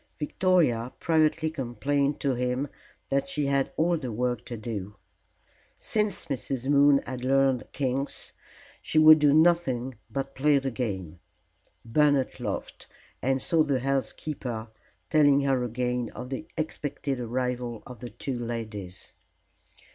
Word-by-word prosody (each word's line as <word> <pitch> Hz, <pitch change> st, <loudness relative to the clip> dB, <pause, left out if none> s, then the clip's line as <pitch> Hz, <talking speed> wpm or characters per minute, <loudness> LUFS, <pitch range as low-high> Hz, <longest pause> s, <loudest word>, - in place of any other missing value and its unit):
Victoria 150 Hz, -8 st, +2 dB
privately 160 Hz, -1 st, +2 dB
complained 140 Hz, +1 st, -1 dB
to 140 Hz, -2 st, +1 dB
him 125 Hz, +3 st, -1 dB, 0.4 s
that 140 Hz, 0 st, +1 dB
she 145 Hz, +1 st, -1 dB
had 140 Hz, -1 st, +1 dB
all 170 Hz, +2 st, +2 dB
the 130 Hz, -6 st, -5 dB
work 120 Hz, +2 st, -1 dB
to 120 Hz, -, -6 dB
do. 105 Hz, -2 st, -5 dB, 0.8 s
Since 210 Hz, -5 st, 0 dB
Mrs. 135 Hz, -3 st, -3 dB
Moon 140 Hz, 0 st, +5 dB
had 125 Hz, -1 st, -6 dB
learned 135 Hz, -1 st, +2 dB
"Kings" 135 Hz, 0 st, -2 dB, 0.5 s
she -, -, -2 dB
would 155 Hz, 0 st, +9 dB
do 145 Hz, -1 st, +5 dB
nothing 150 Hz, -6 st, +3 dB, 0.2 s
but 135 Hz, -1 st, -4 dB
play 145 Hz, +1 st, +3 dB
the 135 Hz, -1 st, -1 dB
game. 95 Hz, -9 st, -4 dB, 0.7 s
Bernard 140 Hz, +2 st, +2 dB
laughed, -, -, -5 dB, 0.3 s
and 135 Hz, +1 st, +1 dB
saw 165 Hz, -2 st, +3 dB
the 140 Hz, -5 st, +1 dB
housekeeper, 130 Hz, -3 st, -3 dB, 0.4 s
telling 145 Hz, -2 st, +5 dB
her 135 Hz, -2 st, +1 dB
again 125 Hz, 0 st, -1 dB
of 125 Hz, +2 st, -7 dB
the 145 Hz, +4 st, -4 dB
expected 145 Hz, -3 st, -3 dB
arrival 125 Hz, -1 st, -3 dB
of 125 Hz, -3 st, -10 dB
the 125 Hz, -, -7 dB
two 120 Hz, +2 st, -5 dB
ladies. 110 Hz, -7 st, -5 dB
135 Hz, 130 wpm, -27 LUFS, 120-145 Hz, 0.8 s, would